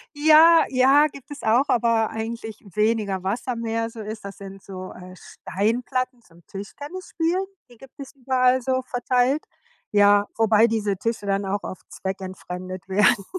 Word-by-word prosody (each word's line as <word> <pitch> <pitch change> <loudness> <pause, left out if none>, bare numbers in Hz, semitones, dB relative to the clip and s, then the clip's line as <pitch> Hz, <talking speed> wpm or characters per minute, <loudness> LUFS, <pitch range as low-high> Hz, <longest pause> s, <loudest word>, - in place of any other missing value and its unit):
Ja, 315 +2 +7
ja, 270 +3 +5
gibt 280 -1 -14
es 290 -1 -9
auch, 235 +5 +3
aber 230 -3 +2
eigentlich 225 -1 -6
weniger 210 -3 0
Wasser, 230 +6 -2
mehr 230 0 -2
so 225 - -11
ist 215 0 -7
das 200 - -8
sind 195 -1 -11
so, 185 -1 -8
äh, 185 0 -12
Steinplatten 240 +7 -3
zum 170 -2 -22
Tischtennisspielen, 330 - -4 0.2
die 240 - -18
gibt 270 +1 -16
es 275 - -9
überall 255 -1 +2
so 260 +1 0
verteilt. 250 +3 0 0.5
Ja, 205 0 +5
wobei 225 0 +4
diese 210 -3 -1
Tische 225 +1 -3
dann 195 0 0
auch 200 +1 -2
oft 185 - -9
zweckentfremdet 185 -1 -6
werden, 200 +1 +3
225 Hz, 150 wpm, -23 LUFS, 200-255 Hz, 0.5 s, Ja